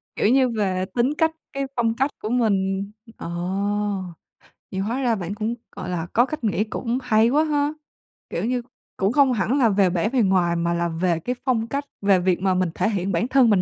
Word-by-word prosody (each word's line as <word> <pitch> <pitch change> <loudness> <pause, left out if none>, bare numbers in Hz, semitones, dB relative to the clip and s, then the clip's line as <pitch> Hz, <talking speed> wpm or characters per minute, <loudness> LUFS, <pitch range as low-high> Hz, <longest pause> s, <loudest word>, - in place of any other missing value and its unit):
kiểu - - +2
như 260 0 +4
về 190 -4 -1
tính 250 +5 +2
cách, 320 -1 +3 0.2
cái 275 0 -2
phong 230 -2 +1
cách 270 +3 +1
của 215 - -3
mình. 200 -4 +1 0.3
Ờ, - - -6 1.4
vậy 190 - -3
hóa 235 +7 -1
ra 235 -3 +2
bạn 195 +1 -4
cũng, 220 +2 -2 0.2
gọi 180 - -6
là, 175 -1 -3
có 240 +2 +5
cách 305 -3 -6
nghĩ 210 -1 +1
cũng 230 +2 -3
hay 225 -1 +4
quá 300 +4 +3
ha! 295 -1 0 0.6
Kiểu 180 - -2
như, 250 0 0 0.4
cũng 195 +2 +1
không 275 -3 +4
hẳn 235 +6 +1
là 235 -4 +5
về 195 -2 +3
bẻ 180 +5 0
bề 255 -2 +2
ngoài 185 -3 +2
mà 170 0 0
là 170 0 0
về 165 0 0
cái 250 +9 -3
phong 230 -3 +1
cách, 280 +3 -3 0.2
về 195 -2 +4
việc 180 -1 +1
mà 190 -1 +2
mình 180 -1 +1
thể 220 - +1
hiện 195 -2 -1
bản 175 +8 0
thân 260 -3 +4
mình 195 -3 +4
215 Hz, 220 wpm, -23 LUFS, 185-250 Hz, 1.4 s, có